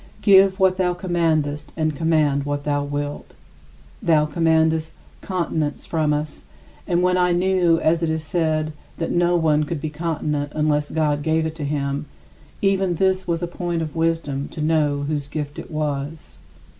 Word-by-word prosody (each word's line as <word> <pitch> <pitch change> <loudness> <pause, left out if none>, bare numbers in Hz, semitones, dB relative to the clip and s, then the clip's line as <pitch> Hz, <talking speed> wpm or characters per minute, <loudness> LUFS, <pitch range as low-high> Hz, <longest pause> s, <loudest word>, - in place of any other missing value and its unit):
Give 195 -1 +6
what 190 -1 +3
thou 180 -1 +1
commandest 160 -5 -1
and 155 -2 0
command 150 -3 +2
what 145 0 -3
thou 145 -1 0
wilt. 145 0 -5 0.7
Thou 155 -3 +3
commandest 160 0 +1 0.3
continence 165 -5 -2
from 155 -2 0
us, 150 0 -3 0.4
and 175 -1 +1
when 180 0 +3
I 180 -1 +3
knew, 175 -2 +3
as 165 +1 +2
it 165 - 0
is 160 0 -1
said, 155 -1 0 0.2
that 165 - -2
no 175 0 +2
one 155 -2 +2
could 155 +1 -3
be 155 +1 -4
continent 150 -2 -2
unless 150 -1 +1
God 150 -2 0
gave 160 +1 +1
it 160 - -3
to 150 - -3
him, 140 -1 -2 0.6
even 195 -2 +2
this 190 +1 +1
was 170 0 -1
a - - 0
point 175 -1 -3
of 155 -1 -6
wisdom 160 -4 -1
to - - -10
know 150 -2 +1
whose 145 -1 -2
gift 145 -1 -5
it - - -9
was. 150 -1 -4
160 Hz, 170 wpm, -22 LUFS, 150-170 Hz, 0.7 s, Give